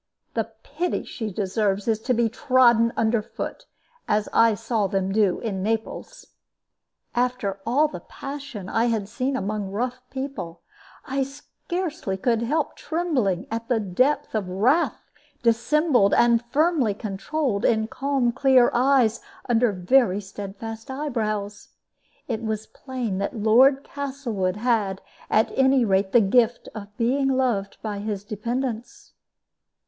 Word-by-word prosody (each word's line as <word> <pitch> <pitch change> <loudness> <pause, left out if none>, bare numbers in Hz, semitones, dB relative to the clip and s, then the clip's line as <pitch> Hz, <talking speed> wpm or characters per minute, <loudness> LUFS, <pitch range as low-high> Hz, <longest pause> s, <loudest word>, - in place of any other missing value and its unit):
The - - -1
pity 360 0 -2
she 220 -4 -5
deserves 200 +1 -1
is 220 -1 +2
to 250 +3 0
be 235 0 +3
trodden 235 -1 +4
under 225 0 +2
foot, - - -7 0.4
as 210 0 +1
I 230 -1 +5
saw 225 -1 -1
them 195 -1 -1
do 200 -3 +2
in 200 -5 -3
Naples." 220 +2 -3 0.9
After 245 -5 -1
all 285 +6 +3
the 295 - -7
passion 275 -8 -8
I 225 +4 +1
had 220 -4 0
seen 255 +5 -2
among 205 -1 -3
rough 245 +6 -3
people, 265 -11 -6 0.4
I 270 +1 -1
scarcely 290 - -4
could 230 +3 +1
help 295 +6 -1
trembling 280 - -1
at 230 0 -3
the 240 -3 +2
depth 255 +9 +1
of 205 -4 -2
wrath 245 - +1 0.3
dissembled 240 -1 +3
and 235 0 +4
firmly 285 - +2
controlled 215 +3 -2
in 220 -1 +3
calm 265 0 0
clear 260 -1 +4
eyes 250 -3 +3 0.3
under 240 -1 +3
very 195 +2 +3
steadfast 205 +3 -8
eyebrows. 215 -7 -3 0.6
It 230 -3 -2
was 220 -1 -3
plain 245 -8 -4
that 200 +5 -3
Lord 255 +6 +5
Castlewood 260 -11 -3
had, 210 -4 0 0.3
at 215 - +3
any 265 -2 +4
rate, 190 -1 +1
the 240 - +6
gift 235 +3 +2
of 205 -1 -9
being 260 +3 +1
loved 250 -7 0
by 210 -2 -3
his 205 -1 -4
dependents. 230 +3 -4
230 Hz, 135 wpm, -24 LUFS, 205-265 Hz, 0.9 s, the